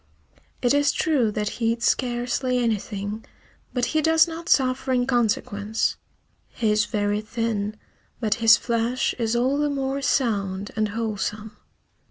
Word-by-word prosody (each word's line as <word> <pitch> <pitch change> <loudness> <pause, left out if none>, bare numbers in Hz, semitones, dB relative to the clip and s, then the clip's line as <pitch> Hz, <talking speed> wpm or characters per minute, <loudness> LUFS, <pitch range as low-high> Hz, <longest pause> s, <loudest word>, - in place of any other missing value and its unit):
It 245 - +4
is 285 0 +3
true 275 -8 +1
that 210 0 -2
he 230 0 +3
eats 230 0 -4
scarcely 250 +1 0
anything, 215 -2 -2 0.5
but 245 -2 0
he 315 - +3
does 320 +2 +4
not 330 0 -7
suffer 260 0 +2
in 250 -1 +2
consequence. 220 -3 0 0.5
He 220 -2 0
is 210 0 +2
very 205 -1 -1
thin, 215 -2 -2 0.4
but 215 -3 +1
his 225 0 +7
flesh 235 +2 0
is 230 0 0
all 260 +4 +1
the 295 0 +1
more 275 0 -2
sound 205 -8 0
and 215 -1 +1
wholesome. 215 0 -3
230 Hz, 145 wpm, -24 LUFS, 215-255 Hz, 0.5 s, his